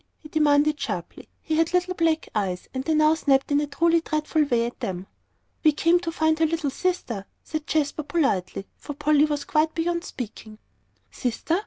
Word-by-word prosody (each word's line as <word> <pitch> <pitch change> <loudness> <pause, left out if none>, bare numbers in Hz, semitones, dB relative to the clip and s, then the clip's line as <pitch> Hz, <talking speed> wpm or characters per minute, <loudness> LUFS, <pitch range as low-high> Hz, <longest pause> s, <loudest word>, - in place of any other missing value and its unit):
he 305 - -14
demanded 300 -1 +3
sharply. - - -5
He 315 -1 -1
had 330 +2 +1
little 360 0 +1
black 325 -2 +1
eyes, 190 -4 -2
and 260 0 -3
they 315 +2 +1
now 305 0 +5
snapped 275 -3 +1
in 285 +1 +3
a 295 - -2
truly 335 +3 +2
dreadful 310 -1 0
way 240 -4 +1
at 240 - -6
them. 185 -1 -4 0.6
"We 310 -2 +5
came 335 +4 +3
to 340 -1 -4
find 315 -1 +1
her 325 - +4
little 315 -3 -1
sister," 260 - -2 0.2
said 310 0 -5
Jasper, 305 -1 0
politely, 280 - -1
for 290 - -8
Polly 300 0 +3
was 295 -2 -2
quite 310 +1 +1
beyond 340 +1 -1
speaking. 220 - -8 0.5
"Sister? 260 +8 -1
305 Hz, 185 wpm, -25 LUFS, 275-325 Hz, 0.6 s, now